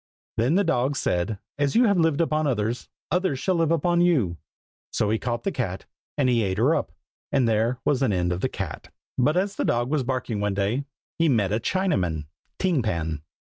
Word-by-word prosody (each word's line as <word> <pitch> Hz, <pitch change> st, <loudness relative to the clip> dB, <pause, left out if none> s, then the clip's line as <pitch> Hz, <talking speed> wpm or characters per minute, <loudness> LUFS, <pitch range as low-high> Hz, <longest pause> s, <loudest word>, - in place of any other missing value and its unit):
Then 125 Hz, +8 st, +2 dB
the 200 Hz, -, +4 dB
dog 140 Hz, -5 st, +1 dB
said, 90 Hz, -2 st, 0 dB, 0.2 s
"As 145 Hz, -1 st, +1 dB
you 245 Hz, -, +6 dB
have 200 Hz, -4 st, +3 dB
lived 160 Hz, -1 st, +3 dB
upon 155 Hz, -2 st, +1 dB
others, 115 Hz, -1 st, -1 dB, 0.2 s
others 180 Hz, -6 st, +1 dB
shall 185 Hz, +8 st, 0 dB
live 165 Hz, -3 st, +2 dB
upon 170 Hz, +1 st, +2 dB
you!" 130 Hz, -, +2 dB, 0.5 s
So 105 Hz, -1 st, +1 dB
he 110 Hz, -, +1 dB
caught 120 Hz, -1 st, -2 dB
the 195 Hz, -, 0 dB
cat, 100 Hz, -, -3 dB, 0.3 s
and 140 Hz, -3 st, +3 dB
he 120 Hz, -2 st, +3 dB
ate 95 Hz, -3 st, -1 dB
her -, -, +4 dB
up. -, -, -1 dB, 0.4 s
And 135 Hz, -4 st, +3 dB
there 115 Hz, +3 st, +1 dB
was 140 Hz, -2 st, +2 dB
an 130 Hz, -, +2 dB
end 90 Hz, -2 st, 0 dB
of 90 Hz, -, -4 dB
the 130 Hz, -, +1 dB
cat. 100 Hz, -9 st, -6 dB, 0.3 s
But 150 Hz, +7 st, +3 dB
as 195 Hz, +2 st, 0 dB
the -, -, 0 dB
dog 120 Hz, +3 st, 0 dB
was 155 Hz, -2 st, +2 dB
barking 125 Hz, -4 st, -2 dB
one 105 Hz, -1 st, 0 dB
day, 105 Hz, +8 st, 0 dB, 0.3 s
He 165 Hz, -1 st, +4 dB
met 105 Hz, -7 st, +2 dB
a 110 Hz, -, +1 dB
Chinaman, 95 Hz, -, 0 dB, 0.3 s
Ting 180 Hz, -7 st, +1 dB
Pan. 80 Hz, -8 st, -2 dB
125 Hz, 205 wpm, -25 LUFS, 105-160 Hz, 0.5 s, you